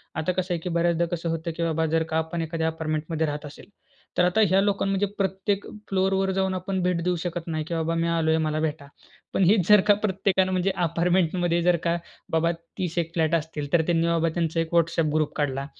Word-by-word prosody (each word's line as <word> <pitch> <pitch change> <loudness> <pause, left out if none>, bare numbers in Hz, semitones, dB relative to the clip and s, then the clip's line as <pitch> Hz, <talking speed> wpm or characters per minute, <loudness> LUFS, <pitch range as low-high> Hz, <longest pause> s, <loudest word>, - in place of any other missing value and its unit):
आता 160 +2 0
कसं 180 0 -2
आहे 170 - -1
की 180 - -3
बऱ्याचदा 170 0 +1
कसं 170 0 -4
होतं 165 +1 -2
की 170 - -1
बाबा 160 -1 0
जर 165 - +2
का - - +2
आपण 160 +1 -2
एखाद्या 160 0 -2
अपार्टमेंटमध्ये 160 0 -2
राहत 150 +1 -4
असेल, 150 +6 -12 0.5
तर 180 - +4
आता 180 +5 +2
ह्या 190 +2 +4
लोकांना 195 -1 0
म्हणजे 195 +1 +1
प्रत्येक 195 +1 -1 0.2
फ्लोरवर 190 0 +1
जाऊन 190 0 0
आपण 185 +1 -2
भेट 180 -2 +1
देऊ 180 0 +1
शकत 175 -1 -4
नाही, 155 -2 -2
की 170 - -5
बाबा 165 0 -1
मी 165 0 0
आलोय 160 -1 +2
मला 155 0 -1
भेटा. 155 -2 -3 0.5
पण - - +2
हीच 185 -1 +4
जर 210 -1 +7
का 205 - +8
प्रत्येकानं 190 -2 +1
म्हणजे 185 +1 +1
अपार्टमेंटमध्ये 175 0 +1
जर 175 0 +4
का 170 0 +1 0.4
बाबा 160 +1 +2 0.3
30 175 -2 -3
एक 165 -1 0
फ्लॅट 160 -1 +1
असतील, 150 -3 -4
तर 170 - +5
त्यांनी 165 -1 +2
बाबा 165 0 +2
त्यांचा 165 -1 0
एक 165 0 -2
WhatsApp 165 -2 +2
ग्रुप 155 -1 0
काढला, 135 -2 -1
170 Hz, 215 wpm, -25 LUFS, 160-185 Hz, 0.5 s, का